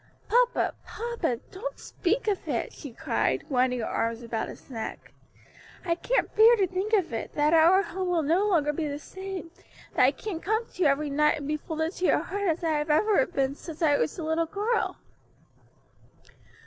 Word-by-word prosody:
"Papa, -, -, +2 dB
papa, 450 Hz, -, -3 dB
don't -, -, -6 dB
speak 425 Hz, +6 st, -2 dB
of 405 Hz, -3 st, -1 dB
it," -, -, -2 dB
she 285 Hz, -, -9 dB
cried, -, -, -1 dB
winding 250 Hz, -2 st, +1 dB
her -, -, -2 dB
arms 230 Hz, +1 st, -2 dB
about 230 Hz, -1 st, -3 dB
his -, -, -12 dB
neck, 225 Hz, -3 st, -6 dB, 0.7 s
"I 340 Hz, -, +2 dB
can't 485 Hz, +8 st, -1 dB
bear 450 Hz, +2 st, +8 dB
to 400 Hz, -4 st, +2 dB
think 375 Hz, +4 st, -3 dB
of 375 Hz, -, +2 dB
it; 225 Hz, -, -4 dB
that 300 Hz, +1 st, +3 dB
our 340 Hz, +4 st, +6 dB
home 375 Hz, -1 st, -4 dB
will 340 Hz, -3 st, +1 dB
no 345 Hz, +8 st, +2 dB
longer 300 Hz, -7 st, +2 dB
be 310 Hz, 0 st, -2 dB
the 285 Hz, 0 st, -3 dB
same, 380 Hz, +2 st, -7 dB, 0.4 s
that -, -, +2 dB
I -, -, +7 dB
can't 375 Hz, -7 st, -5 dB
come 440 Hz, +4 st, 0 dB
to 370 Hz, -, -10 dB
you 325 Hz, -, +5 dB
every 285 Hz, +1 st, 0 dB
night 300 Hz, +2 st, +3 dB
and 285 Hz, -2 st, -6 dB
be 305 Hz, -, 0 dB
folded 320 Hz, +1 st, -3 dB
to 365 Hz, -, -1 dB
your -, -, +4 dB
heart 405 Hz, +1 st, -2 dB
as 325 Hz, +2 st, -1 dB
I 315 Hz, -2 st, +1 dB
have 295 Hz, -, -2 dB
been 300 Hz, -1 st, +4 dB
ever 335 Hz, -9 st, +2 dB
since 325 Hz, +2 st, -7 dB
I 290 Hz, -2 st, +4 dB
was 315 Hz, -, -1 dB
a 335 Hz, -, -4 dB
little 320 Hz, +1 st, 0 dB
girl." 420 Hz, +6 st, -1 dB
330 Hz, 200 wpm, -27 LUFS, 295-395 Hz, 0.7 s, bear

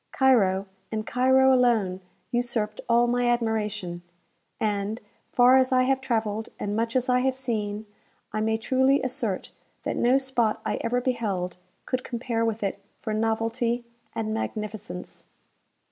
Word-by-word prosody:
Cairo, 200 Hz, -8 st, +3 dB, 0.3 s
and 215 Hz, -1 st, -2 dB
Cairo 260 Hz, +2 st, +4 dB
alone, 225 Hz, -7 st, +2 dB, 0.3 s
usurped 240 Hz, -3 st, -1 dB
all 235 Hz, +1 st, +5 dB
my 245 Hz, 0 st, +1 dB
admiration, 210 Hz, -6 st, -1 dB, 0.6 s
and, 210 Hz, +1 st, -1 dB, 0.3 s
far 250 Hz, +1 st, +6 dB
as 260 Hz, 0 st, +3 dB
I 255 Hz, 0 st, +4 dB
have 265 Hz, +1 st, +1 dB
travelled, 225 Hz, -4 st, -1 dB
and 205 Hz, 0 st, -2 dB
much 230 Hz, +2 st, -1 dB
as 255 Hz, -1 st, +2 dB
I 250 Hz, 0 st, +4 dB
have 260 Hz, 0 st, +1 dB
seen, 215 Hz, -5 st, -3 dB, 0.5 s
I 215 Hz, -, 0 dB
may 220 Hz, 0 st, +1 dB
truly 260 Hz, +4 st, +2 dB
assert 250 Hz, -7 st, -2 dB, 0.3 s
that -, -, -2 dB
no 250 Hz, +3 st, +4 dB
spot 260 Hz, -5 st, 0 dB
I -, -, 0 dB
ever 245 Hz, +2 st, 0 dB
beheld 200 Hz, -9 st, -1 dB, 0.3 s
could 255 Hz, -1 st, -2 dB
compare 235 Hz, -1 st, -2 dB
with 225 Hz, -1 st, -1 dB
it 200 Hz, 0 st, -2 dB, 0.2 s
for 215 Hz, -, -3 dB
novelty 230 Hz, +2 st, 0 dB, 0.3 s
and 215 Hz, -1 st, -2 dB
magnificence. 215 Hz, -, -5 dB
230 Hz, 145 wpm, -26 LUFS, 215-250 Hz, 0.6 s, far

